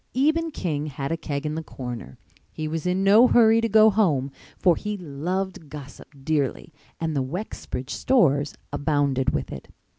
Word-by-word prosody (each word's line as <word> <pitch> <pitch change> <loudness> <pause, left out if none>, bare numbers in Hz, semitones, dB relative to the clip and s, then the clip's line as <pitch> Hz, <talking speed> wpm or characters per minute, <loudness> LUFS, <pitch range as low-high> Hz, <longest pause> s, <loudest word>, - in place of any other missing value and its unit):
Eben 315 +5 +2
King 155 - -3
had 140 0 -4
a - - +1
keg 145 -3 -4
in 150 - -2
the 160 - -3
corner. 125 - -8 0.3
He 155 - -4
was 160 +2 -3
in 185 +2 +1
no 210 +5 +7
hurry 230 -2 +5
to 230 - 0
go 220 +1 +6
home 150 -11 +1 0.3
for 175 -3 +4
he 210 +3 -4
loved 175 +1 -4
gossip 140 -2 -10 0.2
dearly 150 +1 -1 0.3
and 160 -2 -2
the 135 - +1
Wexbridge 135 -3 -5
stores 145 - +2 0.2
abounded 140 -2 +1
with 70 - -3
it. 65 - -8
155 Hz, 170 wpm, -24 LUFS, 140-195 Hz, 0.3 s, no